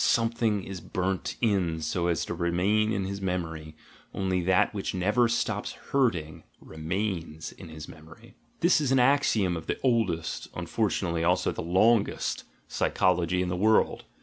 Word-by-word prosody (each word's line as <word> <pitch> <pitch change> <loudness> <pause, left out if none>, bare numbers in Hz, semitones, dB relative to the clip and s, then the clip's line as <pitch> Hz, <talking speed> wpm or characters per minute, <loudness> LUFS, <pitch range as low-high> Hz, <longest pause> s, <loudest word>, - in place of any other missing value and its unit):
"Some 115 -1 +3
thing 110 -4 0
is 95 -2 -7
burnt 95 +2 -2
in 95 -8 +1
so 85 +2 -1
as 85 -2 0
to - - -4
remain 95 +6 +1
in 100 -3 -1
his 100 +1 -5
memory: 80 -4 -4 0.4
only 95 -1 0
that 90 +3 +2
which 100 -2 -3
never 105 +6 +2
stops 115 - -1
hurting 90 - -1 0.2
remains 80 -1 -4
in 90 - -12
his 80 -1 -9
memory." 80 +1 -14 0.3
This 170 -1 +4
is 140 -3 0
an 135 - +4
axiom 125 -8 +3
of 80 -1 -7
the - - -2
oldest 115 -11 0
(unfortunately 90 -2 -1
also 90 +2 +2
the - - -5
longest) 100 +6 +2 0.2
psychology 90 0 +1
in 90 - -3
the 90 - -1
world. 110 +4 +2
95 Hz, 155 wpm, -27 LUFS, 85-110 Hz, 0.4 s, This